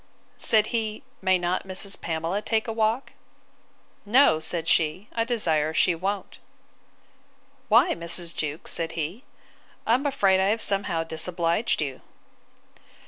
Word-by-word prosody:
Said 215 -2 +3
he, 220 +1 -2 0.2
May 190 -1 +3
not 175 +2 -2
Mrs. 195 +1 -1
Pamela 165 +4 -2
take 220 +1 -1
a 225 - -2
walk?—No, 220 - -1
said 165 0 -1
she; 165 +5 +1
I 230 - 0
desire 160 -10 0
she 180 - +3
won't. 190 +3 -4 1.3
Why, - - +5
Mrs. 170 0 -1
Jewkes? 150 +1 -3
said 165 -1 -1
he: 170 - -5 0.6
I 225 - +3
am 270 +4 +1
afraid 195 -9 +2
I 190 - +2
have 215 +3 +1
somehow 195 -5 +1
disobliged 165 +3 0
you. 135 -3 -6
190 Hz, 130 wpm, -25 LUFS, 165-220 Hz, 1.3 s, Why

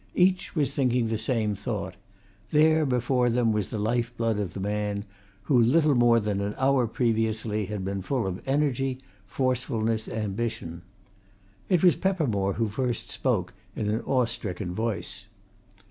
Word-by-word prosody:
Each 185 +1 +2
was 145 -3 +1
thinking 125 -3 +2
the 110 - 0
same 110 -2 0
thought 100 0 -4 0.5
there, 155 0 +4
before 125 0 +2
them, 120 -1 +2
was 105 -3 -1
the - - -4
life 120 +3 -1
blood 115 -2 0
of 95 -5 -4
the - - -4
man 105 +1 -2 0.4
who 125 -1 +3
little 150 +6 +4
more 120 -2 +5
than 105 -2 -1
an 100 +1 -3
hour 130 -2 +3
previously 110 -3 0
had 105 -3 -4
been 100 0 -2
full 125 +3 -1
of 95 0 -4
energy, 135 -2 +1 0.3
forcefulness, 115 -3 -1
ambition. 105 -5 -3 0.9
It 180 -2 +3
was 180 - +6
Peppermore 125 - 0
who 115 +2 0
first 120 +3 -3
spoke, 105 -9 0 0.2
in 105 -1 -1
an 110 +3 -1
awe 130 -2 +2
stricken 100 -5 -4
voice. 110 +1 -4
115 Hz, 155 wpm, -27 LUFS, 105-130 Hz, 0.9 s, was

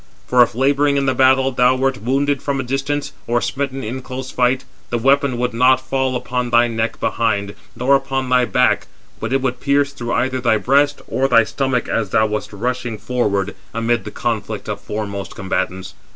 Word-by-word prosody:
For 125 0 +4
if, 120 -1 +3
labouring 140 +2 +2
[in 140 - +1
the 130 - +2
battle], 130 0 +4
thou 125 0 +3
wert 130 -2 -1
wounded 140 +4 0
from 140 -1 -2
a - - -1
distance, 140 +3 -2
or 120 +1 +2
smitten 135 +2 -3
in 125 +5 -4
close 130 0 -6
fight, 125 +1 +1 0.3
the 120 - 0
weapon 135 +1 +2
would 125 0 -1
not 125 +3 +5
fall 130 0 -1
upon 125 0 -2
thy 120 0 +4
neck 115 -1 -2
behind, 100 -3 0 0.2
nor 130 +4 +3
upon 135 -1 -3
thy 125 -1 +3
back; - - +2 0.3
but 115 - -4
it 135 0 +1
would 125 -1 -1
pierce 140 +1 +1
through 120 -3 -4
either 130 +1 0
thy 115 -3 +3
breast, 145 +5 +2
or 135 +1 +1
thy 115 -3 +5
stomach, 125 +3 -1
as 110 -4 -1
thou 110 - +3
wast 105 -1 -3
rushing 120 +2 -3
forward 105 -4 -1 0.2
amid 115 +1 0
the - - -6
conflict - - -3
420 - - -2
of - - -11
foremost 100 -2 -5
combatants. 95 -1 -3
125 Hz, 195 wpm, -19 LUFS, 115-135 Hz, 0.3 s, not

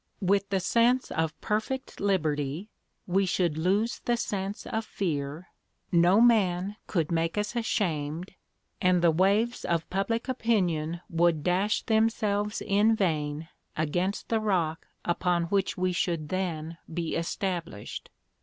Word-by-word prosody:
With 195 +1 +2
the 195 -1 +1
sense 235 +6 +2
of 160 -2 -1
perfect 220 +5 -2
liberty 160 -2 0 0.4
we 190 +2 +1
should 175 -3 +1
lose 195 +8 +1
the 240 0 +2
sense 200 -2 -3
of 220 0 -2
fear, 160 -5 -3 0.4
no 175 +4 +5
man 200 -5 +3
could 165 -5 0
make 165 +2 0
us 210 +3 -1
ashamed, 175 -7 -1 0.5
and 180 -1 +3
the 170 - +6
waves 200 +8 +2
of 170 -2 0
public 195 +6 -1
opinion 175 -10 0
would 165 -2 +2
dash 190 +5 +1
themselves 220 -2 +1
in 210 +2 +3
vain 155 -5 -1 0.3
against 175 +6 -1
the 225 - +2
rock 175 -7 0 0.2
upon 175 0 +1
which 195 0 0
we 185 0 +1
should 170 -6 -1
then 165 -3 -3
be 165 0 -2
established. 170 - -4
185 Hz, 130 wpm, -28 LUFS, 165-210 Hz, 0.5 s, the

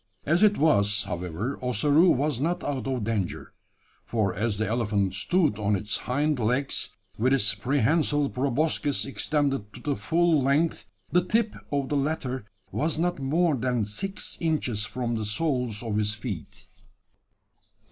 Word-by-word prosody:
As 170 +4 +2
it 210 -1 +5
was, 105 -9 +3
however, 90 - -4
Ossaroo 145 - +4
was 140 -2 +1
not 175 +4 0
out 135 -2 -2
of 130 -4 -1
danger: 105 -4 -3 0.5
for 105 -5 0
as 105 +2 -1
the 110 - 0
elephant 105 -4 0
stood 110 - +1
on 105 0 +2
its 105 +2 -2
hind 145 +3 0
legs, 125 +5 0 0.3
with 130 +4 +3
its 110 -6 +3
prehensile 145 - +2
proboscis 140 +2 0
extended 135 -6 -1
to - - -10
the 145 +1 -1
full 165 -1 +2
length, 140 +5 +1 0.3
the 180 0 +4
tip 220 +3 +1 0.2
of 140 -2 -1
the 145 - +1
latter 135 -5 -2 0.3
was 155 +1 0
not 175 -1 0
more 155 +4 +2
than 125 -3 0
six 195 - -2
inches 130 -10 0
from 120 +2 -3
the 110 - -3
soles 125 -2 -1
of 110 -3 -2
his 105 0 0
feet. 105 - -7
130 Hz, 150 wpm, -26 LUFS, 105-150 Hz, 0.5 s, it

